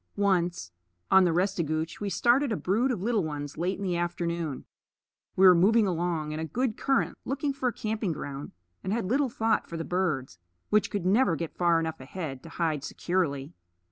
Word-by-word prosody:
Once, 180 Hz, -, 0 dB, 0.4 s
on 190 Hz, -1 st, +7 dB
the 175 Hz, -, +3 dB
Restigouche, 165 Hz, -3 st, -1 dB
we 205 Hz, -, -1 dB
started 245 Hz, +6 st, +3 dB
a -, -, +1 dB
brood 225 Hz, +8 st, +1 dB
of 220 Hz, -8 st, -2 dB
little 225 Hz, -3 st, +1 dB
ones 145 Hz, -2 st, -5 dB
late 180 Hz, +3 st, -1 dB
in 200 Hz, -, -6 dB
the 180 Hz, -2 st, 0 dB
afternoon. 170 Hz, -4 st, -2 dB, 0.7 s
We 190 Hz, -, +5 dB
were 185 Hz, -, +10 dB
moving 210 Hz, +6 st, +4 dB
along 170 Hz, -4 st, -1 dB
in 155 Hz, -, -4 dB
a -, -, -2 dB
good 240 Hz, +6 st, -1 dB
current, 270 Hz, -1 st, +1 dB
looking 280 Hz, +2 st, -2 dB
for 265 Hz, -2 st, 0 dB
a -, -, -6 dB
camping 215 Hz, -3 st, -2 dB
ground, 140 Hz, -2 st, -6 dB, 0.3 s
and 190 Hz, -, -2 dB
had 225 Hz, -1 st, 0 dB
little 265 Hz, +7 st, +1 dB
thought 225 Hz, -1 st, 0 dB
for 170 Hz, -, -5 dB
the 165 Hz, -, -4 dB
birds, 150 Hz, -, -1 dB, 0.3 s
which 210 Hz, 0 st, +3 dB
could 200 Hz, -4 st, -3 dB
never 195 Hz, -1 st, +3 dB
get 165 Hz, +1 st, -5 dB
far 170 Hz, -2 st, +3 dB
enough 160 Hz, -1 st, -3 dB
ahead 135 Hz, -1 st, -6 dB
to 165 Hz, -, -11 dB
hide 160 Hz, -4 st, -1 dB
securely. 150 Hz, -7 st, -2 dB
180 Hz, 195 wpm, -28 LUFS, 160-210 Hz, 0.7 s, were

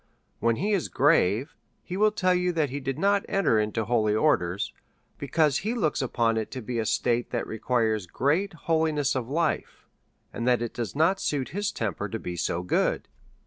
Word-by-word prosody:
When 115 Hz, -1 st, +2 dB
he 200 Hz, -, -1 dB
is 195 Hz, -4 st, 0 dB
grave, 135 Hz, -, +2 dB, 0.3 s
he 180 Hz, -, -6 dB
will 215 Hz, +2 st, +4 dB
tell 185 Hz, -3 st, +2 dB
you 180 Hz, 0 st, +1 dB
that 155 Hz, -5 st, 0 dB
he 140 Hz, -, -3 dB
did 135 Hz, -1 st, -3 dB
not 200 Hz, 0 st, +2 dB
enter 185 Hz, -, +2 dB
into 105 Hz, +1 st, -1 dB
holy 110 Hz, -2 st, +2 dB
orders, 100 Hz, -, +1 dB, 0.5 s
because 145 Hz, 0 st, +2 dB
he 215 Hz, +5 st, -2 dB
looks 160 Hz, -11 st, 0 dB
upon 115 Hz, -3 st, +1 dB
it 110 Hz, -, -2 dB
to 130 Hz, -, -5 dB
be 120 Hz, +1 st, -3 dB
a 110 Hz, -, -1 dB
state 120 Hz, +2 st, 0 dB
that 120 Hz, -, -2 dB
requires 110 Hz, -3 st, 0 dB
great 160 Hz, -, 0 dB
holmess 160 Hz, -3 st, +1 dB
of 125 Hz, -2 st, -3 dB
life, 160 Hz, +2 st, -1 dB, 0.5 s
and 120 Hz, -, -3 dB
that 120 Hz, -2 st, +3 dB
it 120 Hz, -, -4 dB
does 120 Hz, 0 st, -4 dB
not 165 Hz, +6 st, +3 dB
suit 140 Hz, -3 st, -1 dB
his 200 Hz, +5 st, -2 dB
temper 105 Hz, -2 st, -3 dB
to 115 Hz, -, -3 dB
be 90 Hz, -5 st, -6 dB
so 85 Hz, 0 st, -1 dB
good. 90 Hz, -, 0 dB
130 Hz, 190 wpm, -26 LUFS, 110-165 Hz, 0.5 s, will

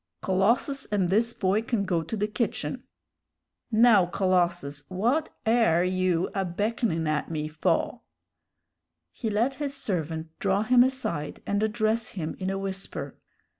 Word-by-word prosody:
Colossus 230 Hz, +9 st, +2 dB
and 195 Hz, -4 st, 0 dB
this 230 Hz, +4 st, +3 dB
boy 200 Hz, -1 st, +1 dB
can 225 Hz, -3 st, -1 dB
go 175 Hz, -3 st, +1 dB
to 190 Hz, +8 st, -5 dB
the 210 Hz, -, +1 dB
kitchen. 215 Hz, +2 st, -3 dB, 0.9 s
Now, 220 Hz, -5 st, +6 dB
Colossus, 175 Hz, -6 st, 0 dB
what 235 Hz, +12 st, 0 dB, 0.2 s
air 220 Hz, -7 st, +4 dB
you 185 Hz, -1 st, +1 dB
a 195 Hz, -, 0 dB
beckonin' 190 Hz, -1 st, -1 dB
at 155 Hz, -1 st, -1 dB
me 155 Hz, -2 st, -2 dB
faw?" 155 Hz, +1 st, 0 dB, 1.1 s
He 225 Hz, -, -4 dB
let 225 Hz, +6 st, +1 dB
his 280 Hz, -1 st, -2 dB
servant 165 Hz, -, -3 dB
draw 200 Hz, +1 st, +1 dB
him 245 Hz, +2 st, +5 dB
aside 250 Hz, -, -3 dB
and 200 Hz, 0 st, 0 dB
address 220 Hz, +1 st, 0 dB
him 165 Hz, -5 st, -4 dB
in 190 Hz, 0 st, -2 dB
a 195 Hz, -, -1 dB
whisper. 195 Hz, 0 st, -5 dB
195 Hz, 140 wpm, -27 LUFS, 175-225 Hz, 1.1 s, Now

